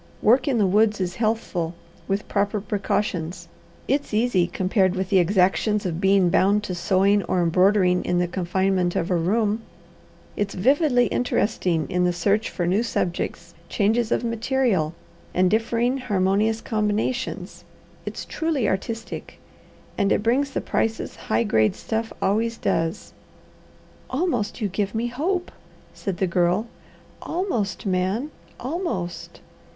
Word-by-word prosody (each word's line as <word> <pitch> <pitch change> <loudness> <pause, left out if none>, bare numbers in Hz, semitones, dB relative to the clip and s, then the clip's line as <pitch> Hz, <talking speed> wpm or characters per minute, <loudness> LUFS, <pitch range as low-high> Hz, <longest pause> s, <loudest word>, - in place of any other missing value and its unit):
Work 255 +5 +4
in 265 -4 +2
the 210 - +3
woods 210 +2 +3
is 180 -1 -2
healthful, 215 -7 -1 0.3
with 200 +1 -1
proper 205 +1 0
precautions; 185 -4 -2 0.4
it's 280 -5 0
easy 215 -6 +2
compared 185 0 +1
with 190 0 -2
the 190 - +5
exactions 195 +3 +2
of 175 -1 -2
being 195 -2 +4
bound 205 +4 +3
to 190 - -4
sewing 195 +3 +2
or 185 - 0
embroidering 180 +1 +3
in 180 - 0
the 175 0 +1
confinement 185 0 0
of 170 - -1
a - - +3
room; 210 +5 +1 0.7
it's 205 -1 -2
vividly 255 - +3
interesting 185 -9 0
in 180 0 0
the 180 0 +2
search 200 +5 +1
for 175 - -2
new 185 +5 +2
subjects, 175 -5 -3 0.2
changes 220 +3 +1
of - - +1
material, 230 - 0 0.4
and 180 0 +3
differing 235 +4 +1
harmonious 210 -1 +1
combinations; 220 +3 -2 0.4
it's - - -6
truly 315 -7 -1
artistic; 225 +4 -4 0.6
and 200 0 +2
it - - +2
brings 260 +5 +2
the - - -3
prices 225 0 -1
high - - 0
grade 110 - +2
stuff 225 0 -3
always 225 +4 +1
does." 165 0 -1 1.0
"Almost 255 - -1
you 210 - +1
give 200 +2 -2
me 235 +2 -1
hope," 355 +9 -2 0.4
said 195 -4 -4
the 190 - +1
Girl. 180 +4 +1 0.6
"Almost, 245 - -2
Man 195 +9 0 0.3
almost! 245 - -4
205 Hz, 135 wpm, -24 LUFS, 180-230 Hz, 1.0 s, the